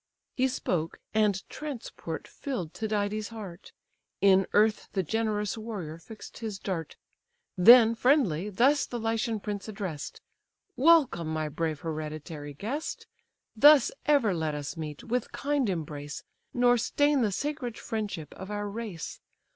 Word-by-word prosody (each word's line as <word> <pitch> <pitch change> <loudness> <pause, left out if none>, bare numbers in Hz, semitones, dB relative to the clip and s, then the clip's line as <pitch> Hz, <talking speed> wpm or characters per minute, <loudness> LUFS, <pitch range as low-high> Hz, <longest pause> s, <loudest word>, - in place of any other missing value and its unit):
He 260 0 +3
spoke, 175 -10 -2 0.2
and 210 -3 +1
transport 245 - -6
fill'd 195 - -5
Tydides' 210 -1 -1
heart; 205 -5 -9 0.5
In 195 -1 +5
earth 215 +1 +3
the 190 -2 +1
generous 215 +2 -1
warrior 190 -8 -6
fix'd 215 +6 -11
his 220 -4 -4
dart, 180 -5 -4 0.6
Then 230 +4 +8
friendly, 225 - +2
thus 265 +8 +3
the 240 - -4
Lycian 225 0 -1
prince 205 0 -5
address'd: 195 -8 -5 0.6
"Welcome, 275 - +4
my 155 -1 -2
brave 155 0 -2
hereditary 155 -2 -5
guest! 270 - -4 0.5
Thus 290 +3 +7 0.2
ever 275 -9 +4
let 160 -3 -1
us 145 +2 -5
meet, 155 -3 -6
with 245 0 -2
kind 285 -5 0
embrace, 150 -4 -5 0.3
Nor 245 -1 +4
stain 290 +4 +2
the 215 -3 +2
sacred 260 0 -3
friendship 205 -8 -4
of 190 - -9
our 205 0 -3
race. 205 -6 -6
210 Hz, 130 wpm, -28 LUFS, 165-235 Hz, 0.6 s, Then